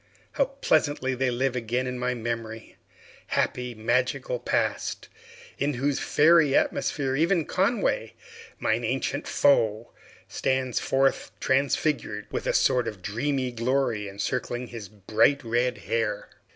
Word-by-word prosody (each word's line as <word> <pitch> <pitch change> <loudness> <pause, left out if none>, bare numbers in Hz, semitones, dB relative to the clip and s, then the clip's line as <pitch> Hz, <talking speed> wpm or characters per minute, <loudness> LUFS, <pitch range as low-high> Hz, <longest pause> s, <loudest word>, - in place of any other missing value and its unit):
How 275 - +2
pleasantly 150 - 0
they 130 0 0
live 130 +1 0
again 120 +1 -1
in 125 0 -4
my 125 0 -1
memory! 115 -1 -5 0.5
Happy, 125 -1 -1
magical 125 - 0
Past, - - -1 0.5
in 145 -1 0
whose 135 +3 0
fairy 155 -2 +4
atmosphere 135 -3 0
even 165 +2 +2
Conway, 235 - 0 0.4
mine - - 0
ancient - - -2
foe, 115 -5 +2 0.4
stands 130 -2 -1
forth 135 0 +1
transfigured, 135 -5 0
with - - -3
a - - +2
sort 125 -1 +3
of 95 -4 -6
dreamy 130 +5 -1
glory 115 -3 0
encircling 120 +4 -3
his 110 -5 -8
bright 110 +8 +2
red 120 +1 0
hair! 110 -2 -2
125 Hz, 125 wpm, -26 LUFS, 115-140 Hz, 0.5 s, fairy